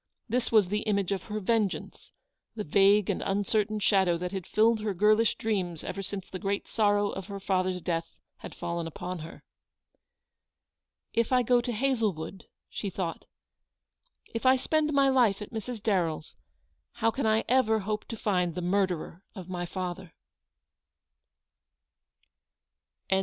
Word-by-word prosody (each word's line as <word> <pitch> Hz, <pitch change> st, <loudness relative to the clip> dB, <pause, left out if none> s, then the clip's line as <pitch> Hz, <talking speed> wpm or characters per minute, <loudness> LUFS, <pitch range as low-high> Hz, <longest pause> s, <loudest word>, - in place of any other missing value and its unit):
This 245 Hz, +1 st, 0 dB
was 210 Hz, -5 st, +5 dB
the 210 Hz, +2 st, 0 dB
image 200 Hz, -3 st, +1 dB
of 190 Hz, -2 st, -2 dB
her 215 Hz, -1 st, -3 dB
vengeance, 210 Hz, -1 st, -1 dB, 0.4 s
the 215 Hz, -, -3 dB
vague 200 Hz, +4 st, +4 dB
and -, -, -1 dB
uncertain 205 Hz, +2 st, 0 dB
shadow 190 Hz, -4 st, +3 dB
that 180 Hz, +1 st, -4 dB
had 190 Hz, -3 st, -5 dB
filled 225 Hz, +1 st, +3 dB
her 210 Hz, -2 st, -2 dB
girlish 215 Hz, +4 st, +4 dB
dreams 185 Hz, -7 st, -2 dB
ever 195 Hz, -, -4 dB
since 195 Hz, 0 st, -6 dB
the 185 Hz, -, -7 dB
great 200 Hz, 0 st, -2 dB
sorrow 205 Hz, -2 st, +2 dB
of 190 Hz, -2 st, -6 dB
her 200 Hz, -1 st, -6 dB
father's 185 Hz, -1 st, 0 dB
death 165 Hz, -2 st, -2 dB, 0.2 s
had -, -, -10 dB
fallen 170 Hz, -1 st, -3 dB
upon 180 Hz, +2 st, -5 dB
her. 160 Hz, +1 st, -10 dB, 1.7 s
"If 230 Hz, +1 st, +1 dB
I 250 Hz, -1 st, +4 dB
go 245 Hz, +1 st, +4 dB
to 240 Hz, 0 st, -3 dB
Hazlewood," 215 Hz, -8 st, -1 dB, 0.2 s
she 200 Hz, -, -4 dB
thought, 175 Hz, -3 st, -4 dB, 1.1 s
"if 230 Hz, -, -3 dB
I 260 Hz, 0 st, +6 dB
spend 305 Hz, +3 st, +1 dB
my 275 Hz, -1 st, +4 dB
life 240 Hz, -7 st, +3 dB
at 210 Hz, -, -8 dB
Mrs. 225 Hz, +1 st, -4 dB
Darren" 180 Hz, -7 st, +1 dB
s, 155 Hz, -, -14 dB, 0.6 s
how 225 Hz, +1 st, +1 dB
can 265 Hz, 0 st, -1 dB
I 220 Hz, +1 st, +3 dB
ever 230 Hz, -4 st, +3 dB
hope 210 Hz, +2 st, -3 dB
to 230 Hz, -, -6 dB
find 180 Hz, -6 st, 0 dB
the 180 Hz, -, -3 dB
murderer 180 Hz, -2 st, 0 dB
of 185 Hz, -3 st, -8 dB
my 175 Hz, -1 st, -3 dB
father 180 Hz, -1 st, -5 dB
200 Hz, 150 wpm, -29 LUFS, 180-220 Hz, 1.7 s, I